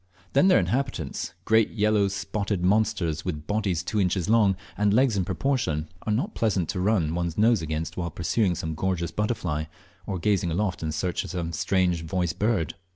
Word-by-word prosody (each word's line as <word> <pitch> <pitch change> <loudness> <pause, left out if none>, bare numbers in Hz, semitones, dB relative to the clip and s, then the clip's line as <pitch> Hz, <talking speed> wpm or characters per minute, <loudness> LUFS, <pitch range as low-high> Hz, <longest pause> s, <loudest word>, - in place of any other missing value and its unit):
Then 140 +7 +5
their 185 - +6
inhabitants, 125 - -2
great 110 -1 +4
yellow 105 -2 +2
spotted 100 -1 -2
monsters 90 -6 +1
with 75 -4 -4
bodies 100 -5 -1
two 105 +3 0
inches 90 -2 0
long, 105 -3 +4 0.2
and 105 0 +2
legs 125 +1 +3
in 95 - +1
proportion, 90 - -1 0.2
are - - +1
not 140 - 0
pleasant 95 -7 0
to 95 - -2
o - - -1
run 90 -6 +2
one's 85 -1 -2
nose 110 -1 +4
against 80 0 -4
while 85 -1 -2
pursuing 90 +4 0
some 80 0 -3
gorgeous 85 0 -1
butterfly, 90 -6 -1 0.4
or 95 - -2
gazing 95 -1 +1
aloft 95 +3 -1
in 80 -1 -2
search 85 +4 -1
of - - -8
some 85 -2 -3
strange 90 0 +1
voiced 85 -1 -2
bird. 105 -7 +1
95 Hz, 185 wpm, -26 LUFS, 85-105 Hz, 0.4 s, their